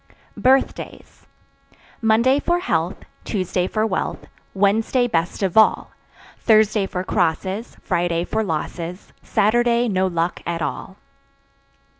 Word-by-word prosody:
Birthdays. 265 +1 -1 0.7
Monday 235 +5 +3
for 345 +4 +1
health, 360 - -2 0.2
Tuesday 185 -3 -1
for 215 +2 0
wealth, 195 -4 -3 0.3
Wednesday 220 +5 +2
best 170 -1 -1
of 190 -3 -1
all, 220 0 +4 0.5
Thursday 215 -2 +3
for 180 -1 -4
crosses, 185 +4 -1
Friday 175 -3 0
for 220 +4 -1
losses, 170 +1 -5
Saturday 240 +3 +2
no 190 -3 +1
luck 170 -1 -2
at 170 -1 -3
all. - - -5
200 Hz, 110 wpm, -21 LUFS, 175-225 Hz, 0.7 s, all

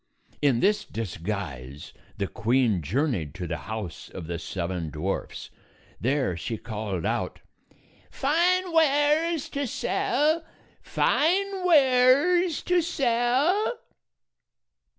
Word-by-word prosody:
In 135 -5 +3
this 210 +1 +2
disguise 85 - -6 0.2
the 100 - -1
queen 115 -2 +1
journeyed 95 - -1
to 90 - -5
the 85 0 -3
house 110 -6 -6
of 90 - -8
the 85 0 -4
seven 85 -1 -4
dwarfs. 80 +6 -4 0.5
There 130 - 0
she 110 +7 -4
called 105 -6 -4
out, - - -2 0.7
"Fine 350 +5 +1
wares 310 +1 +3
to 280 -1 -2
sell! 310 +7 0 0.4
Fine 385 +4 +1
wares 295 +3 +4
to 360 -1 +2
sell 285 - +1
160 Hz, 100 wpm, -26 LUFS, -, 0.7 s, wares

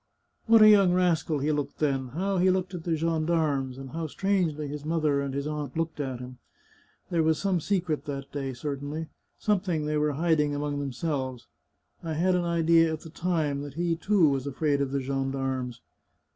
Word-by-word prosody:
What 225 -1 +7
a - - +9
young 200 -4 +6
rascal 170 -4 +2
he 145 +2 0
looked 145 -2 -2
then! 135 -3 0
How 185 +8 -1
he 185 +1 +4
looked 185 0 0
at 175 -2 -6
the 165 -2 +1
gendarmes, 155 -5 0
and 135 -1 -8
how 165 0 -3
strangely 165 -4 0
his 145 +1 -6
mother 155 -3 +1
and 140 -1 -3
his 140 +1 -3
aunt 150 -2 -4
looked 165 -1 -2
at 130 -4 -3
him! 125 0 -9 0.7
There 170 -2 +2
was 160 -1 +2
some 195 -3 0
secret 170 -3 -1
that 140 -1 -5
day, 135 -2 -3
certainly 145 +4 -4
— - - -47
something 185 -7 0
they 150 0 0
were 150 0 +1
hiding 150 -1 +1
among 145 0 -2
themselves. 130 -2 -3 0.6
I 165 -2 -4
had 180 +4 +2
an 180 -1 +1
idea 165 -1 +4
at 155 - -4
the 160 - -11
time 160 -5 -1
that 145 -1 -8
he, 170 0 0
too, 180 0 +3
was 135 0 -1
afraid 140 +1 0
of 140 - 0
the 140 0 -1
gendarmes." 135 -2 -2
150 Hz, 195 wpm, -27 LUFS, 140-170 Hz, 0.7 s, a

